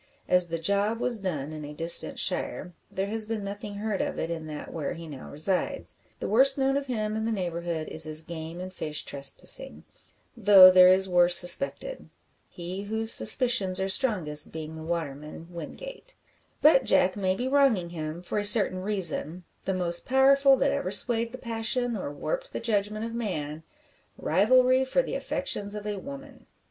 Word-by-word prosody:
As 180 -1 +3
the 165 0 -3
"job" 200 +6 0
was 240 -2 0
done 155 -7 -4
in 155 -1 -7
a 150 0 -9
distant 165 +2 +2
shire, 180 - -2 0.2
there 190 - -3
has 215 +1 -4
been 220 -2 -4
nothing 205 +1 -7
heard 210 -1 -3
of - - -3
it 165 - -3
in 160 -2 -5
that 150 -1 -8
where 155 -4 -4
he 165 0 -10
now 140 -4 -10
resides. 180 +6 -2 0.2
The - - -4
worst 265 +6 +4
known 270 0 +1
of 280 0 -2
him 215 -4 -3
in 220 - -2
the 230 - -1
neighbourhood 170 -5 -3
is 160 0 -6
his 155 0 -4
game 165 +1 -8
and 185 +1 -7
fish 150 -4 -3
trespassing, 140 - -3 0.5
though 195 -4 +8
there 185 0 +7
is 190 +1 +4
worse 175 -1 +5
suspected. 275 - 0 0.4
He 180 +2 -7
whose 220 +2 +1
suspicions 200 -8 +3
are 190 - -1
strongest 185 - 0
being 160 0 -7
the 160 - -9
waterman, 160 -1 -6
Wingate. - - -10 0.5
But 290 -3 +6
Jack 185 0 +2
may 190 -2 0
be 245 +6 -3
wronging 260 -11 +2
him, 160 +1 -6
for 195 - -2
a - - -2
certain 205 -3 +4
reason 185 -4 -1 0.2
the 190 - -1
most 175 -2 -3
powerful 275 +1 +5
that 275 +2 +1
ever 280 0 -2
swayed 230 -1 +2
the 255 - -8
passion 235 +1 -2
or 185 -8 -5
warped - - -5
the - - -3
judgment 215 -1 -1
of 230 - -6
man 160 -10 -4 0.6
rivalry 255 +8 +3
for 380 - +1
the - - -6
affections 205 0 -3
of 210 0 -7
a 210 -1 -3
woman. 275 +2 -11
195 Hz, 180 wpm, -26 LUFS, 170-235 Hz, 0.6 s, though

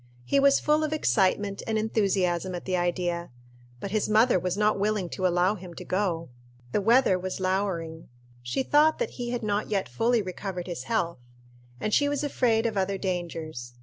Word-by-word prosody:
He 280 - +2
was 275 0 +5
full 300 +1 +2
of 310 0 -1
excitement 200 -7 +1
and 220 -1 0
enthusiasm 190 -5 0
at 175 - -7
the 185 - 0
idea. 175 -1 -1 0.5
But 195 - -5
his 215 0 0
mother 220 -1 +4
was 180 +2 -2
not 210 -1 +2
willing 205 -3 0
to 185 +1 0
allow 180 +2 +2
him 180 -4 -10
to - - -8
go. 180 -5 -1 0.4
The 205 - +1
weather 230 -3 +4
was 185 +1 -4
lowering. 185 -4 -2 0.3
She 120 - -2
thought 300 +3 +4
that 485 - -2
he 240 -1 -5
had 240 -1 -3
not 210 0 -1
yet 200 -3 0
fully 225 - +1
recovered 185 -1 -5
his 175 -2 -6
health; 175 - -1 0.6
and 215 - -2
she 285 0 +3
was 290 0 -1
afraid 235 -5 +1
of 220 -3 -1
other 195 0 0
dangers. 165 -9 -4
195 Hz, 185 wpm, -27 LUFS, 175-225 Hz, 0.6 s, was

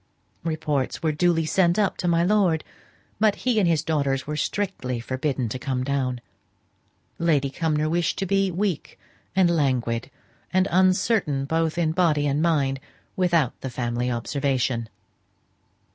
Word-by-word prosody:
Reports 155 -5 -2
were 160 - +2
duly 165 +1 +2
sent 175 +2 +2
up 205 -2 +2
to 180 - -3
my 170 0 +3
lord, 180 -5 +2 0.6
but 215 -1 +3
he 245 -2 +1
and 190 - +3
his 160 -2 +2
daughters 140 -4 0
were 150 - -3
strictly 145 - -2
forbidden 130 +1 -2
to 125 +4 -5
come 130 -1 -2
down. 130 -2 -1 1.0
Lady 145 -5 +2
Cumnor 155 0 0
wished 170 +2 0
to 195 - -1
be 195 +1 +2
weak 185 -2 -2 0.4
and 190 -2 +5
languid, 130 -5 0 0.4
and 185 +1 +2
uncertain 185 -5 +2
both 160 +2 0
in 165 -2 +1
body 160 -4 +2
and 145 +1 +1
mind, 140 -5 +1 0.4
without 170 -8 +2
family 120 -1 -2
observation. 125 -1 -1
155 Hz, 140 wpm, -24 LUFS, 135-175 Hz, 1.0 s, and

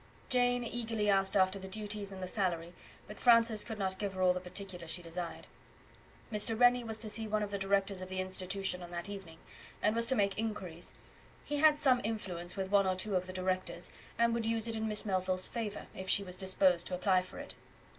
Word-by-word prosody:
Jane 245 -1 +2
eagerly 225 -3 -1
asked 195 +1 +2
after 190 +1 +3
the 190 - -8
duties 205 0 -5
and 190 -1 -7
the - - -3
salary, 175 -4 -1 0.3
but 210 - -10
Francis 230 -3 +5
could 220 -2 -6
not 190 -2 -2
give 200 -2 -2
her 185 - -3
all 180 0 +5
the 180 - -3
particulars 180 -2 -7
she 175 - -4
desired. 170 0 -5 0.9
Mr. 220 +1 +3
Rennie 245 0 +5
was 220 -1 -4
to 225 - -3
see 220 +1 0
one 215 0 0
of 205 - -4
the 200 - -2
Directors 195 0 +1
of 185 - -7
the 185 0 -3
Institution 185 0 -1
on 175 - -8
that 175 +2 -4
evening, 190 -5 -8 0.4
and 215 +1 +2
was 230 0 +4
to 260 - +2
make 200 -2 +1
inquiries; 190 -6 -4 0.5
he 295 - -2
had 305 0 +6
some 265 -4 +3
influence 180 -5 -4
with 190 0 -3
one 200 -1 +4
or 185 - +1
two 195 +2 0
of 180 0 0
the 185 - -7
directors, 185 0 -2 0.3
and 235 0 +3
would 230 -1 -1
use 225 0 +1
it 230 - -3
in 220 0 -2
Miss 210 0 0
Melville's 185 -2 +1
favour 215 -3 -4
if 190 0 -7
she 200 - +3
was 180 -2 -4
disposed 185 -2 +3
to 180 - -1
apply 185 0 +3
for 185 - -11
it. - - -8
195 Hz, 225 wpm, -33 LUFS, 185-220 Hz, 0.9 s, had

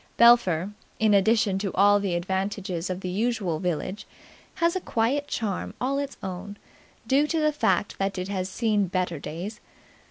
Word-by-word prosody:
Belpher, 205 -7 +5 0.3
in 220 -1 +3
addition 200 -1 +3
to 195 -2 -2
all 205 +1 +5
the 195 -3 -1
advantages 190 0 -2
of 185 0 -3
the 185 - -4
usual 200 -5 -1
village, 180 +3 -3 0.5
has 335 +1 +1
a 375 - -1
quiet 270 +5 0
charm 205 -5 -3
all 275 +2 0
its 280 -1 -4
own, 195 +2 -6 0.5
due 275 +5 +3
to 325 +1 0
the 305 -1 +2
fact 200 -9 0
that 195 0 -1
it 185 0 -3
has 190 -2 -2
seen 210 -1 +1
better 180 -3 -2
days. 185 +10 -6
200 Hz, 165 wpm, -26 LUFS, 185-230 Hz, 0.5 s, Belpher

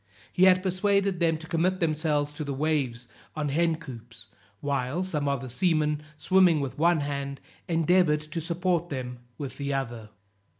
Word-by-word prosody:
He 185 - +5
had 185 -1 +5
persuaded 195 0 +1
them 165 -2 +2
to 160 - -10
commit 175 +3 0
themselves 150 -3 0
to 150 - -5
the 140 -2 -3
waves 135 -5 -1 0.3
on 150 -2 -1
hen 165 +3 +2
coops, 120 -8 -11 0.3
while 140 +4 -1
some 150 -6 -2
of 140 -3 0
the 130 - -6
seamen, 150 +2 +1 0.2
swimming 180 0 +4
with 140 0 -4
one 170 -1 +4
hand, 140 -1 -3 0.3
endeavored 165 -2 +3
to 155 +2 -5
support 175 +1 0
them 125 -3 -5 0.2
with 140 -3 -6
the 140 -1 -2
other. 120 -5 -4
155 Hz, 165 wpm, -27 LUFS, 140-170 Hz, 0.3 s, He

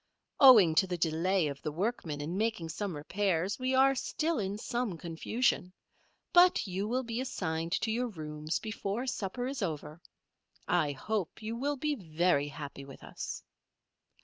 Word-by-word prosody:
Owing 220 - +9
to 190 - -5
the 180 -1 -2
delay 170 +3 +1
of 140 -2 -4
the 155 - -3
workmen 165 -4 -2
in 160 +5 -4
making 210 -6 -1
some 185 +1 -3
repairs, 185 - -1
we 255 +1 0
are 270 +1 +5
still 310 +3 -1
in 200 0 -2
some 235 -4 -2
confusion, 175 +4 -1 0.6
but 360 0 +6
you 195 +1 -2
will 255 +3 0
be 235 0 -3
assigned 165 -9 -2
to 225 - 0
your 245 +3 0
rooms 155 -5 -4
before 215 +2 -3
supper 245 -1 -3
is 270 -1 -4
over. 155 -2 -4 0.7
I 155 -5 +2
hope 205 +7 -3
you 220 +2 -3
will 285 +4 -1
be 300 +3 0
very 170 - +1
happy 145 -2 -8
with 135 0 -12
us." - - -6
190 Hz, 160 wpm, -31 LUFS, 160-240 Hz, 0.7 s, Owing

